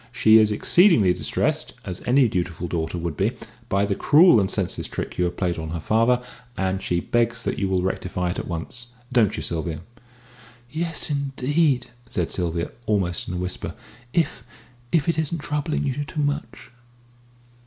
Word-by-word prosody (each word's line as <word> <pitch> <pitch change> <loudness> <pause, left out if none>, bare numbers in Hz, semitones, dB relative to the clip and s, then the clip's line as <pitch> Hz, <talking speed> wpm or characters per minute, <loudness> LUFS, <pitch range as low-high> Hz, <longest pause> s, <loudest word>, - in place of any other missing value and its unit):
She 110 0 +6
is 110 -1 +4
exceedingly 115 - +5
distressed - - -1
(as 90 -1 -5
any 130 +1 +5
dutiful 90 -3 -2
daughter 80 0 -2
would 85 -2 -3
be) 105 - +1 0.4
by 100 0 +2
the 100 - 0
cruel 150 - +6
and 95 -2 +1
senseless - - -2
trick - - -5
you 90 - +3
have 90 - -3
played 90 -2 0
her 80 +1 -4
father, 115 +8 +2 0.3
and 95 0 -1
she 85 - 0
begs 115 +3 0
that - - -2
you 100 - 0
will 95 -1 +1
rectify 90 -1 -2
it - - -4
at - - -5
once. 90 +8 -5 0.3
Don't 110 -5 +3
you, - - -3
Sylvia?" 80 -2 -3 0.9
"Yes, 165 -1 -2
indeed!" 140 -1 +1 0.2
said 85 -3 -1
Sylvia, 85 -2 -1 0.2
almost 95 -5 0
in 90 - -4
a - - -2
whisper, 90 0 -4 0.4
"if 150 -6 0 0.5
if 165 -1 +2
it 165 -1 +1
isn't 160 +2 -1
troubling 150 0 -2
you 140 +1 -1
too 150 +1 -3
much!" 145 -3 -3
105 Hz, 170 wpm, -24 LUFS, 90-140 Hz, 0.9 s, She